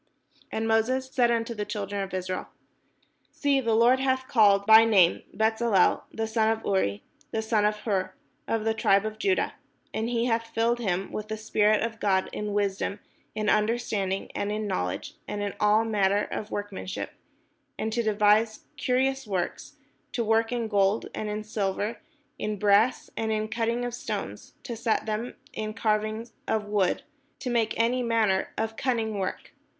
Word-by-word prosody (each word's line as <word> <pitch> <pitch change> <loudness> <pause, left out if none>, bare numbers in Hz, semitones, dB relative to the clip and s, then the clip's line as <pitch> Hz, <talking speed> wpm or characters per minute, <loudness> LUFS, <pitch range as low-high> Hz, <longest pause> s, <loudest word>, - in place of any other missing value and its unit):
And 220 0 -1
Moses 255 +4 +1
said 245 -4 +3
unto 235 0 0
the 210 -2 -3
children 205 -1 -3
of 195 0 -4
Israel: 185 0 -3 0.8
"See, 280 -2 +1
the 230 -3 +1
Lord 240 +3 +5
hath 260 -1 0
called 200 -4 +4
by 220 +1 +9
name 195 -6 +4
Bezaleel 220 -1 +2
the 225 - -2
son 220 0 +1
of 225 0 -1
Uri, 105 - 0 0.3
the 220 -4 -2
son 220 -2 +2
of 210 0 +2
Hur, 190 -4 -1 0.4
of 225 -1 0
the 225 - +2
tribe 200 -2 +3
of 215 0 -5
Judah; 385 -2 +1 0.4
and 225 +1 -1
he 235 -1 0
hath 230 -1 0
filled 230 +1 +1
him 195 -4 -1
with 215 0 -5
the 220 - -4
spirit 215 0 +2
of 225 -1 -4
God, 190 -3 +1
in 210 0 -3
wisdom, 200 0 -1 0.4
in 215 -1 -2
understanding, 210 -3 0
and 205 - -2
in 215 0 -2
knowledge, 90 - -3
and 205 0 -3
in 200 - -2
all 210 +2 +4
manner 205 -2 +2
of 215 - -5
workmanship; 205 -2 -5 0.6
and 220 0 -2
to 240 - +1
de\ise 215 0 +3 0.2
curious 265 0 0
works, 190 +8 -3 0.4
to 240 - 0
work 225 +1 +2
in 240 -2 -1
gold, 200 0 +1
and 215 - -3
in 210 +1 -3
silver, 210 +1 -2 0.4
and 215 - -1
in - - -5
brass, 210 +5 +3
and 220 0 -1
in 215 0 0
the 215 - -6
cutting 235 +2 -1
of 245 - -4
stones, 245 - -5
to 235 - -5
set 225 0 0
them, 215 +1 -2
and - - -10 0.2
in 215 0 -4
carving 215 +1 0 0.2
of 220 -1 0
wood, 205 -3 +1 0.3
to 255 -2 -4
make 230 -2 0
any 240 +2 +2
manner 225 -5 +1
of 220 0 -2
cunning 225 -5 -1
work. 185 - -4
220 Hz, 175 wpm, -27 LUFS, 205-230 Hz, 0.8 s, by